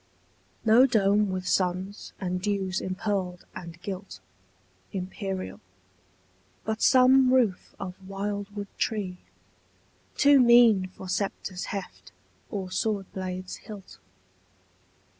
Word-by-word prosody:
No 230 +4 +7
dome 205 -3 +3
with 185 0 -3
suns 185 +2 -1
and 180 -1 -2
dews 195 -2 -1
impearled 185 -2 -2
and 170 -1 -9
gilt, 190 - -6 0.7
Imperial: 190 0 -4 1.1
but 220 0 -2
some 260 0 +6
roof 240 -8 +1
of 185 -2 -5 0.2
wildwood 200 +1 -4
tree, 195 -5 -1 1.0
Too 285 -1 +6
mean 235 -6 +6
for 185 0 -11
sceptre's 185 -1 -3
heft 195 -2 -7 0.4
or 190 -3 -4
swordblade's 185 -2 -3
hilt. 205 -3 -11
195 Hz, 95 wpm, -27 LUFS, 185-215 Hz, 1.1 s, No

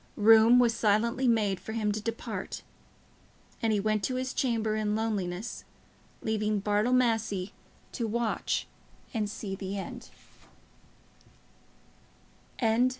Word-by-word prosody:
Room 225 +3 +7
was 240 -2 +4
silently 230 +5 +2
made 210 -5 +2
for 220 - -7
him 215 -2 0
to 210 +1 -3
depart, 230 +1 -5 1.0
and 225 -2 +2
he 210 - +2
went 215 0 0
to 255 - -2
his 255 +1 -2
chamber 225 -5 0
in 210 -1 0
loneliness, 210 -2 -3 0.6
leaving 215 -1 0
Bartle 210 +4 +1
Massey 225 -6 +1 0.4
to 230 - -2
watch 230 +1 -1 0.5
and 215 -3 -1
see 205 -1 -5
the 195 +1 -4
end. 195 - -7
220 Hz, 115 wpm, -29 LUFS, 205-230 Hz, 1.0 s, Room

